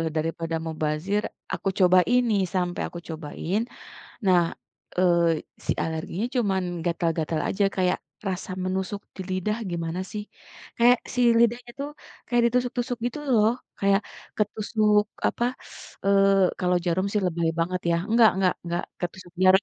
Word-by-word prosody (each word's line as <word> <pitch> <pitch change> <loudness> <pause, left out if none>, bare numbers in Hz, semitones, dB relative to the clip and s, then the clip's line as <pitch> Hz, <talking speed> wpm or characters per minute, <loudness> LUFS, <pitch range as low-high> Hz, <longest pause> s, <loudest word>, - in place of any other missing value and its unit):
daripada 165 +1 -1
mubazir, 160 +6 -1 0.3
aku 195 - -1
cobain 185 +7 +5
nih, 200 - +3
sampai 180 -1 0
aku 175 - -8
cobain. 160 +5 -3 0.7
Nah, 185 -2 +6 0.6
eee, 170 -3 +3 0.2
si - - +1
alerginya 160 +6 -3
cuman 200 -6 +2 0.2
gatal-gatal 165 -2 0
aja, 200 - 0
kayak 180 -1 +2 0.3
rasa 185 0 -4
menusuk 190 +2 -2 0.2
di - - -4
lidah 200 +4 -1
gimana 170 0 -3
sih. 210 -1 -4 0.5
Kayak 245 +1 +6 0.2
si 250 - +2 0.2
lidahnya 240 +1 +2
tuh, 285 - -3 0.4
kayak 240 -1 +3
ditusuk-tusuk, 245 0 0
gitu 245 +4 -2 0.2
loh. 215 -1 +5 0.3
Kayak 200 +1 +3 0.4
ketusuk 210 0 +2 0.2
apa, - - -1 0.6
eee, 195 -1 +4
kalau 180 0 +2
jarum 180 +2 +1
sih 210 - +2
lebay 170 -2 0
banget 180 +2 0
ya. 170 - +3
Enggak 230 -1 +7
enggak 190 -2 +2
enggak 175 +1 -2 0.2
ketusuk 175 0 -6
jarum. 190 +1 +7
185 Hz, 140 wpm, -25 LUFS, 170-210 Hz, 0.7 s, Enggak